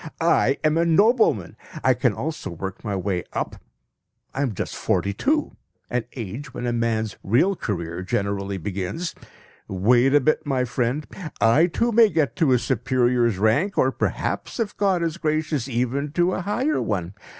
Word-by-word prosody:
I 165 -5 +3
am 155 +1 +3
a - - +4
nobleman! 170 - +3 0.3
I 130 - +5
can 125 0 +1
also 155 +1 -4
work 95 +3 -6
my 105 -3 -2
way 95 -1 -1
up. - - -3 0.8
I 135 - -2
am 125 -7 -1
just - - -4
forty 100 - 0
two 300 - 0 0.4
an 125 -1 -1
age 115 +4 -6
when 125 - -4
a 120 - 0
man's 110 -3 -1
real 145 - +2
career 85 - -4
generally 100 +1 -2
begins. 100 - -4 0.5
Wait 120 +8 +3
a - - +7
bit, 155 +3 +1
my 135 -3 0
friend! 125 +4 -1 0.3
I 115 +11 +5
too 235 +7 0
may 225 -1 +6
get 155 -7 0
to 160 -7 +3
a 125 - +5
superior's 120 -2 +1
rank; 115 - +1
or 130 - +3
perhaps, - - -3
if 225 -3 -2
God 190 -4 +1
is 165 0 -2
gracious, 155 -5 -1
even 130 +3 -1
to 175 +2 +2
a - - -2
higher 250 - 0
one. 95 -3 -2
125 Hz, 170 wpm, -23 LUFS, 105-165 Hz, 0.8 s, a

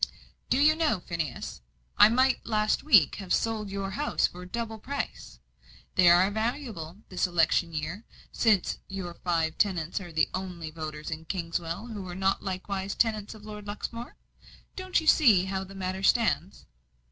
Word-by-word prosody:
"Do - - +3
you 300 +3 +5
know, 315 - +1
Phineas, 160 - -5 0.3
I - - +8
might 255 +3 +2
last 215 -1 +1
week 210 - +5
have 195 -3 -7
sold 220 -2 0
your 195 0 -3
houses 295 +9 +1
for 180 +1 -10
double 225 +2 -4
price? 280 +6 -5 0.6
They 180 -2 +6
are 180 +3 +5
valuable, 220 - -4
this 185 0 0
election 170 0 +2
year, 160 +7 -4 0.3
since 215 -5 +2
your 190 -3 -5
five 165 -2 -1
tenants 180 -3 0
are 175 -3 -9
the 160 -1 +2
only 180 -4 -5
voters 155 -1 -6
in 160 +1 -5
Kingswell 170 +1 -3
who 210 -5 -7
are 175 - -6
not 190 +1 +1
likewise 190 +1 -3
tenants 215 -2 0
of 215 -1 -13
Lord 210 -1 -8
Luxmore. 230 +3 -6 0.6
Don't 370 -1 0
you 320 - -7
see 225 - +6
how 190 0 -2
the 195 +1 -11
matter 190 0 -3
stands?" 200 -4 +1
195 Hz, 160 wpm, -28 LUFS, 175-220 Hz, 0.6 s, I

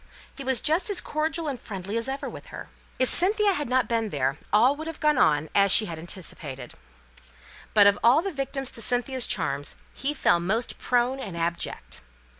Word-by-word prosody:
He 275 - -8
was 260 -3 +1
just 320 +7 +2
as 405 - -1
cordial 315 +1 -2
and 270 -4 -4
friendly 200 0 -6
as 230 +3 -1
ever 270 +1 -4
with - - -10
her. - - -10 0.3
If 255 - +2
Cynthia 405 - +4
had 295 -8 -4
not 255 0 +1
been 225 -2 -1
there, 135 -4 -1 0.2
all 240 +7 +4
would 315 +2 -7
have 325 - -7
gone 300 -3 +2
on 150 0 +3
as 200 -1 +4
she 215 - +6
had 165 -5 -7
anticipated; 155 -7 -7 1.0
but 205 -1 +7
of 200 0 +4
all 255 +8 +5
the 390 -2 -4
victims 270 -1 -3
to 230 - -2
Cynthia's 245 +2 +1
charms 145 -5 -2 0.2
he 290 +2 -3
fell 175 - +3
most 215 +7 -2
prone 250 +2 0
and 190 -10 -7
abject. 165 - -4
240 Hz, 195 wpm, -25 LUFS, 175-280 Hz, 1.0 s, but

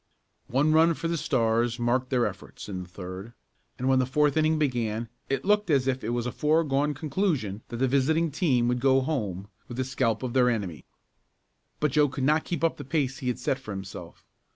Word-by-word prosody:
One 145 +5 +2
run 165 +1 +5
for 165 - -3
the 170 - 0
Stars 120 -5 +1
marked 125 +1 0
their 125 -3 +2
efforts 95 -2 -7
in 95 -3 -4
the 90 - -10
third 95 +4 -8 0.4
and 130 - -2
when 130 -1 +4
the 130 - +1
fourth 145 +1 +2
inning 155 0 +3
began 120 -6 -1 0.2
it 135 -1 -1
looked 210 -1 +2
as 135 -4 +3
if 130 0 -1
it 110 - -2
was 120 0 -1
a 125 - -2
foregone 150 -1 +1
conclusion 145 - -1
that 120 - -6
the 130 +2 +2
visiting 155 +5 +2
team 135 -7 +2
would 125 0 +1
go 135 +1 +4
home 105 - -3 0.2
with 120 - -8
the 130 - +1
scalp 130 -3 -1
of 125 -2 -3
their 125 -2 +4
enemy. 100 -9 -3 0.9
But 150 -2 +1
Joe 145 +1 +3
could 135 -1 -4
not 150 +3 +2
keep 170 -2 -3
up 165 - +2
the 145 - -7
pace 135 -2 -1
he 130 - -5
had 125 - 0
set 135 - -1
for 130 - -12
himself. 95 -3 -9
130 Hz, 215 wpm, -27 LUFS, 115-150 Hz, 0.9 s, run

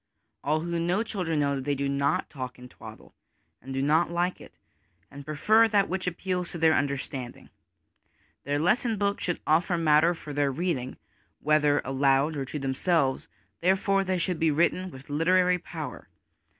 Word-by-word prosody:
All 155 +2 +1
who 170 0 -2
know 175 +6 +1
children 180 -8 -2
know 140 -1 +1
that 135 - -4
they 145 +1 -1
do 140 +1 -2
not 140 0 0
talk 130 -3 -7
twaddle 125 0 -13 0.5
and 135 - -9
do 135 0 -1
not 155 +4 +3
like 175 +1 -1
it, - - -14 0.6
and 140 0 -10
prefer 215 +10 +3
that 200 -2 +2
which 185 +1 -3
appeals 180 0 -2
to - - -6
their 160 -1 +4
understanding. 140 -3 -3 0.9
Their 145 +1 -1
lesson 220 - +1
books 200 0 -1
should 175 - -2
offer 170 +3 +2
matter 165 +1 +4
for 150 -2 -9
their 145 -1 +1
read 170 +2 -1
ing, 125 +1 -7 0.4
whether 150 -1 +2
aloud 135 +3 +2
or 140 -2 -3
to 140 - -6
themselves; 135 +1 0 0.3
therefore 195 +2 +2
they 185 -1 -1
should 175 -1 -2
be 160 - +3
written 170 +4 +1
with 135 -4 -13
literary 180 +4 +2
power. - - -8
160 Hz, 170 wpm, -27 LUFS, 140-180 Hz, 0.9 s, their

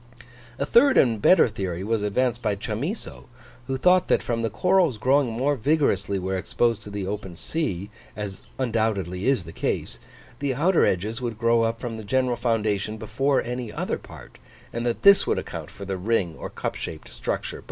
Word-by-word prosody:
A 140 - -1
third 260 - +5
and 115 -5 +3
better 180 - +6
theory 95 -5 -4
was 110 +1 0
advanced 120 +3 0
by 105 -3 0
Chamisso, 120 - -5 0.4
who 135 - -1
thought 180 +6 +4
that - - +2
from 115 -1 -1
the 115 - 0
corals 180 - +2
growing 130 +3 +2
more 135 +6 +1
vigorously 120 -7 +1
where 95 0 -2
exposed 115 +3 0
to 105 - -9
the 100 -1 -4
open 95 -2 -5
sea, 100 - -3 0.2
as 105 -2 -6 0.2
undoubtedly 110 -6 -1
is 135 -8 +2
the 80 - -10
case, - - -3 0.4
the 140 -2 -1
outer 170 +6 +3
edges 110 +7 -1
would 120 -3 -3
grow 115 0 +3
up 115 0 0
from 120 -3 -5
the 110 - -7
general 125 +3 +1
foundation 110 -3 0
before 120 +6 0
any 120 -2 -4
other - - -2
part, - - -13 0.3
and 120 +1 -2
that 120 - -2
this 200 0 +7
would - - +1
account - - -5
for 100 - -9
the 95 -1 -3
ring 95 -4 0
or - - -7
cup - - -4
shaped - - -7
structure. - - -3
115 Hz, 185 wpm, -25 LUFS, 100-130 Hz, 0.4 s, this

